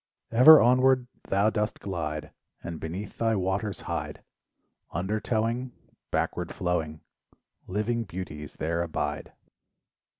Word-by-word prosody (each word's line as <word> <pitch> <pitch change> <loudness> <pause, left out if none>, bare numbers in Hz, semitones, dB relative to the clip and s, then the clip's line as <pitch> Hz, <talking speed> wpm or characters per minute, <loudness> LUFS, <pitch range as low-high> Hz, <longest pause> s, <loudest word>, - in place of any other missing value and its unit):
Ever 130 +7 +9
onward 130 +1 +4 0.2
thou 100 +3 +3
dost 105 0 -2
glide, 75 -6 -4 0.3
And 85 -2 -5
beneath 95 +6 -6
thy 115 -1 +2
waters 95 +2 -1
hide, - - -4 0.7
Undertowing, 110 +6 -1 0.4
Backward 90 -1 -1
flowing 80 -4 -2 0.7
Living 115 +4 -1
beauties 75 - -7
there 85 +2 -1
abide. 75 -3 -3
100 Hz, 100 wpm, -27 LUFS, 85-115 Hz, 0.7 s, Ever